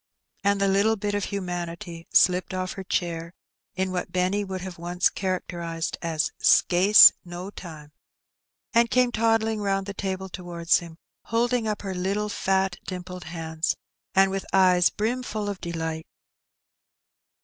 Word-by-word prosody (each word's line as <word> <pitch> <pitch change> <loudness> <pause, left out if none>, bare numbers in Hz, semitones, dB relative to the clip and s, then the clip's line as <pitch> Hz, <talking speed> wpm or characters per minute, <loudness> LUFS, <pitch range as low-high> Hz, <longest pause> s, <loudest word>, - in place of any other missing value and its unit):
And 200 0 +2
the 200 - +2
little 200 +3 +3
bit 205 0 -3
of 205 -1 -1
humanity 175 -2 -5
slipped 180 0 +3
off 185 0 -3
her 195 - -7
chair 170 -2 -3 0.4
in 185 0 -1
what 180 -1 -3
Benny 185 +3 0
would 190 -2 -5
have 180 -2 -8
once 175 +1 +1
characterized 170 -3 -3
as 160 -2 -1
"sca'ce 190 +4 +7
no 180 +2 -7
time," 155 -6 -10 0.8
and 235 0 +4
came 250 -1 +3
toddling 225 -1 +1
round 195 -1 0
the 200 - -5
table 190 -1 -4
towards 175 -2 0
him, 170 -2 -11 0.3
holding 235 0 0
up 210 -1 -3
her 195 -1 -3
little 200 +3 -1
fat 190 -2 0
dimpled 180 -1 -7
hands, 160 -1 -2 0.4
and 195 0 +5
with 195 0 -3
eyes 185 -2 +5
brimful 220 -1 -3
of 200 -2 -5
delight. 160 -1 -4
185 Hz, 145 wpm, -25 LUFS, 175-205 Hz, 0.8 s, sca'ce